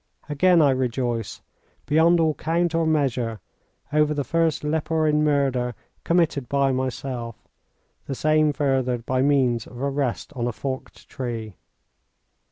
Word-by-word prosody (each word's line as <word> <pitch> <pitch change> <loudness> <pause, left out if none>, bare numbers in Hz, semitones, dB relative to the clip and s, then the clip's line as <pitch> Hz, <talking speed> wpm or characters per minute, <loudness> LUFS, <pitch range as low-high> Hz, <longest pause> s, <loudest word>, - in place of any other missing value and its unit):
Again 165 +3 +4
I 140 - +5
rejoice, 120 -3 -2 0.4
beyond 165 +3 +4
all 160 -1 +3
count 170 +3 -1
or 165 -1 +1
measure, 125 -7 0 0.5
over 150 0 +3
the 145 - -1
first 165 0 0
leporine 155 0 +1
murder 135 -5 +1 0.3
committed 165 -7 +1
by 140 -1 +2
myself, 130 -2 -4 0.6
the 135 - -3
same 155 +1 +3
furthered 130 -5 0
by 130 0 0
means 130 -5 +2
of 120 - -11
a 140 +1 -1
rest 135 0 -2
on 120 -3 -2
a - - 0
forked 130 +3 -6
tree. 115 -5 -5
140 Hz, 135 wpm, -24 LUFS, 125-155 Hz, 0.6 s, I